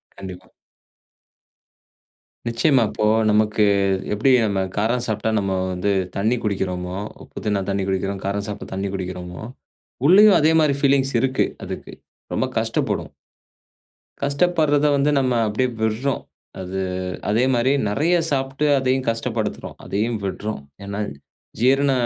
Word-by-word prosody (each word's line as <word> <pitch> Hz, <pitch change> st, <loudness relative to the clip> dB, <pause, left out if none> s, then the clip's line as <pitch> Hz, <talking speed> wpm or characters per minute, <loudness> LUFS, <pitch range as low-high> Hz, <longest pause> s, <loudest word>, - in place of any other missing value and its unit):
கண்டிப்பா. 95 Hz, -2 st, -9 dB, 2.0 s
நிச்சயமா. 125 Hz, +2 st, +3 dB
இப்போ 105 Hz, 0 st, -1 dB, 0.2 s
நமக்கு 105 Hz, 0 st, +3 dB, 0.5 s
எப்டி 110 Hz, +6 st, +3 dB
நம்ம 100 Hz, -2 st, 0 dB, 0.2 s
காரம் 115 Hz, +4 st, +1 dB
சாப்ட்டா 110 Hz, 0 st, -1 dB
நம்ம 100 Hz, -1 st, -1 dB, 0.2 s
வந்து 90 Hz, +3 st, -1 dB, 0.2 s
தண்ணீ 110 Hz, +5 st, +1 dB
குடிக்கிறோமோ, 90 Hz, -3 st, -2 dB, 0.3 s
உப்பு -, -, -10 dB
திண்ணா 105 Hz, -2 st, +1 dB
தண்ணீர் 100 Hz, -1 st, -1 dB
குடிக்கிறோம், 95 Hz, +1 st, -2 dB
காரம் 100 Hz, +1 st, -1 dB
சாப்ட்டா 105 Hz, 0 st, -6 dB
தண்ணீர் 95 Hz, 0 st, -3 dB
குடிக்கிறோமோ, 90 Hz, 0 st, -6 dB, 0.6 s
உள்ளேயும் 205 Hz, +4 st, +7 dB
அதே 155 Hz, +2 st, +4 dB
மாரி 145 Hz, -2 st, +3 dB
ஃபீலிங்ஸ் 135 Hz, -1 st, +3 dB
இருக்கு, 130 Hz, 0 st, +2 dB, 0.2 s
அதுக்கு. -, -, -7 dB, 0.4 s
ரொம்ப -, -, +1 dB
கஷ்டப்படும். -, -, -1 dB, 1.1 s
கஷ்டப்பட்றத 150 Hz, 0 st, +2 dB
வந்து 140 Hz, +1 st, +2 dB
நம்ம 130 Hz, -2 st, +1 dB
அப்டியே 125 Hz, +5 st, 0 dB
விட்றோம். 115 Hz, +5 st, 0 dB, 0.4 s
அது 95 Hz, +1 st, -4 dB, 0.5 s
அதே 110 Hz, +3 st, +2 dB
மாரி 120 Hz, +2 st, +2 dB, 0.2 s
நிறைய 155 Hz, +12 st, +2 dB
சாப்ட்டு 135 Hz, +1 st, -1 dB
அதையும் 130 Hz, 0 st, 0 dB
கஷ்டப்படுத்துறோம். 115 Hz, -1 st, -3 dB
அதையும் 110 Hz, +4 st, -1 dB
விட்றோம். 100 Hz, -3 st, -4 dB, 0.2 s
ஏனா 100 Hz, +1 st, -5 dB, 0.6 s
ஜீரண 135 Hz, +3 st, +3 dB
110 Hz, 120 wpm, -22 LUFS, 100-135 Hz, 2.0 s, உள்ளேயும்